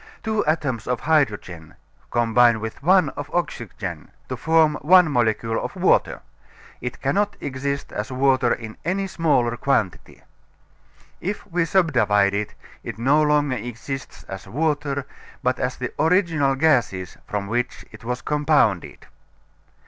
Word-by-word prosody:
Two 220 -1 0
atoms 130 -8 -1
of 125 -1 -1
hydrogen 105 - 0 0.3
combine 120 0 +3
with 110 +4 -6
one 180 0 +4
of 145 +1 -7
oxygen 175 -2 -4 0.2
to - - -2
form 160 -1 +3
one 180 0 +6
molecule 115 -2 0
of - - -5
water. - - +2 0.6
It 125 - -5
cannot 200 +9 0
exist 140 +1 -4
as 105 +5 -4
water 130 -1 +2
in 110 -1 -4
any 190 +4 -1
smaller 150 -10 +1
quantity. 115 -9 -1 1.0
If 205 +3 -4
we 175 -3 0
subdivide 125 - +3
it, 105 +1 -3 0.3
it - - -6
no 135 +6 +3
longer 145 -3 +2
exists 125 +4 -7
as 95 -1 -9
water, 145 +2 -1 0.4
but 125 0 +1
as 125 0 -2
the 125 - -4
original 160 -4 +2
gases 120 - +1
from 105 -3 -3
which 120 +4 -3
it - - -13
was 125 +1 -4
compounded. 145 - +1
135 Hz, 135 wpm, -23 LUFS, 115-155 Hz, 1.0 s, one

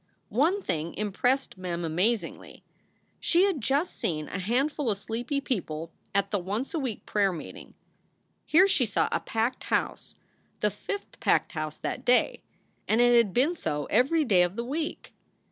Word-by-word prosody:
One 335 - +2
thing 160 +1 -2
impressed 215 +3 0
Mem 175 -2 -3
amazingly. 190 +8 -1 0.6
She 350 +2 +3
had 380 -9 +1
just 280 +9 0
seen 155 -3 -2
a 185 - -4
handful 260 +7 0
of 205 - +1
sleepy 235 +7 -3
people 165 - -3 0.2
at 200 0 +1
the 205 - +1
once 205 - -3
a 325 - 0
week 255 -7 -4
prayer 200 -2 +2
meet 170 - -7
ing. - - -13 0.7
Here 365 +5 +5
she 265 -11 +2
saw 205 - +1
a - - +1
packed 225 +3 -2
house, - - -2 0.5
the - - +2
fifth 405 0 -6
packed - - +2
house 155 -2 -4
that - - -4
day, 250 0 +3 0.5
and 220 - +3
it 240 0 +6
had 230 -4 +4
been 275 - +2
so 150 - -2
every 285 +8 +3
day 195 -7 +4
of 180 +1 +1
the 235 +1 -3
week. 305 +5 -4
230 Hz, 170 wpm, -28 LUFS, 185-275 Hz, 0.7 s, it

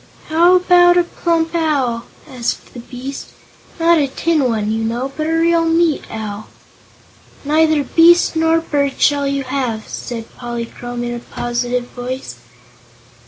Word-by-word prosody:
"How 340 +3 +5
about 355 -1 +5
a 350 - +5
plump 335 -1 -1
owl?" 275 -8 0 0.2
asked 250 -5 -4
the 245 - -8
beast. 255 +3 -8 0.5
"Not 335 0 +4
a 285 - +1
tin 310 +1 0
one, 215 -2 -1
you 225 0 -1
know, 240 +4 -2
but 310 0 -2
a - - -1
real 335 0 +3
meat 330 -1 +2
owl." 215 -1 -6 1.0
"Neither 310 0 +3
beast 335 +5 +4
nor 325 0 +2
bird 285 -4 -1
shall 285 -1 +2
you 275 0 -1
have," 255 -5 -3
said 230 -2 -7
Polychrome 240 0 -6
in 240 0 -3
a 240 - -5
positive 240 +1 -3
voice. 255 +1 -6
280 Hz, 145 wpm, -17 LUFS, 240-330 Hz, 1.0 s, How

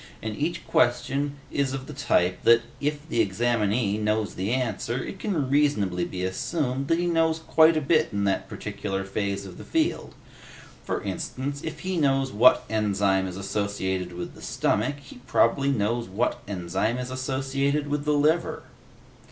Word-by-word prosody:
And 110 -1 -3
each 170 +6 -2
question 140 -1 +1 0.2
is 135 -2 0
of 135 -1 -4
the 150 - -8
type 90 -10 +1
that, 115 0 +5 0.2
if 145 +1 -2
the 120 - +1
examinee 105 0 +1
knows 105 0 0
the 95 +4 -2
answer, 120 -2 -1
it 195 - -7
can 215 - -4
be - - -1
reasonably 105 - +1
assumed 135 - -1
that 165 - +3
he 175 - 0
knows 165 -2 +2
quite 160 0 +4
a - - +1
bit 155 +2 +3
in 100 0 -1
that 95 -1 0
particular 100 -1 -4
phase 100 0 -2
of 90 -2 -10
the - - -8
field. 325 0 -1 0.7
For - - -3
instance, 140 +2 -4
if 155 -1 -5
he 185 -1 -2
knows 135 -3 +2
what 120 +5 +5
enzyme 100 -3 +1
is 90 0 -6
associated 95 -2 -2
with 85 0 -6
the - - -14
stomach, 125 +7 0
he 140 -2 -13
probably 135 +3 +3
knows 115 -2 0
what 105 +6 -1
enzyme 95 +4 -1
is 125 0 -4
associated 135 +2 -1
with 145 0 -1
the 150 0 +1
liver." 155 +4 +1
125 Hz, 170 wpm, -26 LUFS, 100-145 Hz, 0.7 s, that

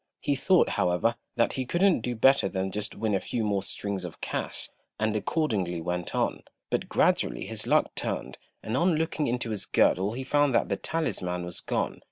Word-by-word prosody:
He 145 - 0
thought, 180 +6 +3
however, 90 +6 +1 0.2
that 115 - +2
he 130 - -2
couldn't 175 - +3
do 120 +1 -2
better 135 -2 +4
than 95 0 -2
just 105 +1 -4
win 110 -2 -1
a 95 - +2
few 115 +3 -2
more 100 -2 +1
strings 100 0 -4
of 90 -3 -8
cash, - - -3 0.3
and 110 0 +1
accordingly 105 - 0
went 90 +1 -3
on; - - 0 0.3
but - - -1
gradually - - +2
his - - -4
luck - - +3
turned, 65 - -4 0.2
and 110 - -2
on 170 +5 +3
looking 160 -1 0
into 120 -1 -1
his 105 - -1
girdle 95 +4 +2
he 130 +3 -4
found 145 -1 +2
that - - +2
the - - +1
talisman 90 - -2
was 90 0 -5
gone. - - -2
110 Hz, 195 wpm, -28 LUFS, 95-135 Hz, 0.3 s, better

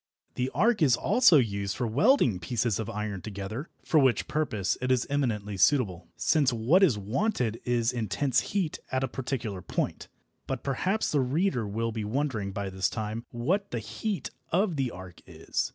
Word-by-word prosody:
The 125 +1 -1
arc 215 +4 +3
is 135 -6 +5
also 195 - +5
used 100 -6 0
for 125 - -1
welding 125 - +3
pieces 115 +4 -1
of 110 - -3
iron 105 -2 -4
together, 105 - -6 0.2
for 155 - +4
which 130 -4 +2
purpose 140 -11 0
it 125 - -1
is 125 -1 +2
eminently 105 -8 -1
suitable, 95 - +2
since 145 -5 +3
what 120 - +3
is 155 - +4
wanted 115 - -1
is 120 0 +1
intense 125 +3 +1
heat 190 -6 -2
at 130 0 0
a - - +1
particular 120 -6 -4
point. - - -3 0.4
But 135 -2 -3
perhaps 185 +10 0
the 150 - +2
reader 130 - 0
will 115 +3 -2
be 110 -1 -4
wondering 110 -3 -2
by 100 0 -4
this 95 0 0
time 110 +1 -4
what 175 +13 -1
the - - -3
heat 205 - -4 0.2
of 185 0 +2
the 135 -3 0
arc 90 -3 -11
is. - - -3
120 Hz, 175 wpm, -28 LUFS, 105-150 Hz, 0.4 s, is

